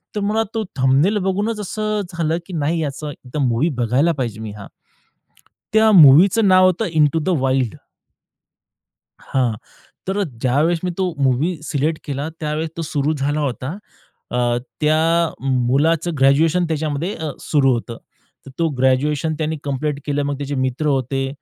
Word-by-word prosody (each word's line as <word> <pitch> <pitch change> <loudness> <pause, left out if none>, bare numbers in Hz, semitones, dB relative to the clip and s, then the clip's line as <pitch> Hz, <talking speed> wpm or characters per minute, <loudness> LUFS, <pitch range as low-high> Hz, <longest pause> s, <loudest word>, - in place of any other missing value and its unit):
तर - - -1
मला 215 +2 +1
तो 220 - 0
थंबनेल 135 +11 +3
बघूनच 205 +4 -1
असं 215 +1 -2
झालं 165 -1 0
की 185 - -9
नाही, 160 +1 -1
याचं 150 0 -4
एकदा 130 +2 -8
मूव्ही 125 +8 +1
बघायला 130 +9 +2
पाहिजे 120 -6 -4
मी 110 -2 -6
हा. 100 - -9 1.1
त्या 220 0 +5
मूव्हीचं 185 +6 +7
नाव 185 0 +6
होतं, 185 +5 0
इंटू 155 +1 +3
द 185 - -2
वाइल्ड. 130 -4 0 1.5
हां, 125 -4 0 0.6
तर 200 +1 0 0.2
ज्यावेळेस 155 +7 +1
मी 180 - 0
तो 185 -2 0
मूव्ही 140 +6 +1
सिलेक्ट 155 +1 -1
केला, 145 +1 -4
त्यावेळेस 155 +1 -2
तो 165 - -3
सुरू 150 -1 -1
झाला 145 +2 -1
होता. 135 +4 -3 0.5
अ, 120 -1 +1 0.2
त्या 160 +2 +2 0.2
मुलाचं 145 +7 +1
ग्रॅज्युएशन 155 +6 +3
त्याच्यामध्ये 155 +3 -2
अ, 160 -2 -4
सुरू 135 -4 +2
होतं. 115 0 -3 0.5
तर - - -9
तो 165 -1 +2
ग्रॅज्युएशन 140 +4 +1
त्यांनी 155 0 -2
कंप्लीट 145 +1 -2
केलं. 145 0 0
मग 140 0 -2
त्याचे 145 0 -4
मित्र 130 +3 -1
होते. 135 -1 0
150 Hz, 150 wpm, -20 LUFS, 135-170 Hz, 1.5 s, मूव्हीचं